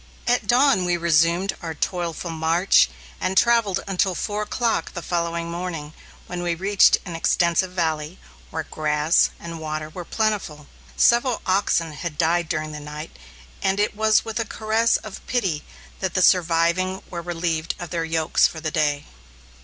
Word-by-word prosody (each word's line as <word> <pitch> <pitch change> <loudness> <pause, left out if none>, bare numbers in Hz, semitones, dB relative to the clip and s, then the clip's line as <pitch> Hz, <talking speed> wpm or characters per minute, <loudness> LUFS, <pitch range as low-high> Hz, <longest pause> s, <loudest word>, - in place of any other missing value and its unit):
At 245 +1 +1
dawn 255 -5 +4
we 175 -1 +1
resumed 170 +3 +2
our 165 -2 -5
toilful 170 +1 -3
march, 165 - +3 0.3
and 190 +1 -1
travelled 230 -5 +3
until 190 -1 +1
four 210 +3 -2
o'clock 230 +2 -1
the 175 - -5
following 170 -1 -2
morning, 170 -4 -5 0.3
when 180 0 -5
we 175 -1 -1
reached 195 +3 +4
an 175 -3 -6
extensive 170 +2 +1
valley, 160 -1 -2 0.3
where - - -4
grass 150 +1 +2
and 170 -1 -7
water 155 0 -4
were 180 +2 -7
plentiful. 200 -8 -2 0.3
Several 240 0 +3
oxen 185 -4 +1
had 150 0 -6
died 170 0 +1
during 155 -1 -2
the 150 - -7
night, 150 +1 -8 0.5
and 195 +1 +1
it 210 0 +1
was 220 0 +3
with 225 +1 -3
a - - +1
caress 220 +2 +1
of 215 -3 -10
pity 190 -12 -1 0.4
that 190 -2 -3
the 185 - +3
surviving 180 +2 +2
were 170 - -4
relieved 165 -1 -2
of 175 -2 -8
their 170 -1 -1
yokes 160 -1 +2
for 160 - -8
the 155 0 -3
day. 150 -2 0
175 Hz, 160 wpm, -23 LUFS, 160-195 Hz, 0.5 s, dawn